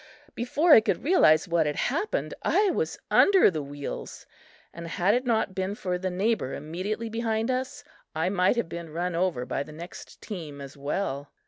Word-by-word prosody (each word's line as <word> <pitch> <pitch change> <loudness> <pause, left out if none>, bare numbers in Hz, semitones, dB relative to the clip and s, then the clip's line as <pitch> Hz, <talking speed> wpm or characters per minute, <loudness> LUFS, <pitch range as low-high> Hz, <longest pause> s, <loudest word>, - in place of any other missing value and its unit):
before 295 +8 +1
I 220 - +9
could - - -1
realize 195 - +4
what 165 -3 +2
had 150 - -1
happened, 415 - -1
I 405 -2 +3
was 460 +6 -2
under 385 - +6
the 155 -3 -3
wheels, 145 0 -7 0.5
and 170 0 -8
had 180 +4 +1
it 250 +2 0
not 220 -4 +1
been 190 +2 -2
for 180 -3 -3
the 185 0 -2
neighbor 190 - -1
immediately 185 +9 -4
behind 225 +1 -1
us, 255 +1 -3 0.3
I 160 +3 +1
might 185 +2 +2
have 235 - -1
been 170 0 -7
run 175 +3 -2
over 170 -8 0
by 135 - -2
the 140 - -7
next 170 +4 -10
team 160 -8 -7
as 140 -1 -9
well. 140 -1 -3
185 Hz, 185 wpm, -27 LUFS, 155-230 Hz, 0.5 s, I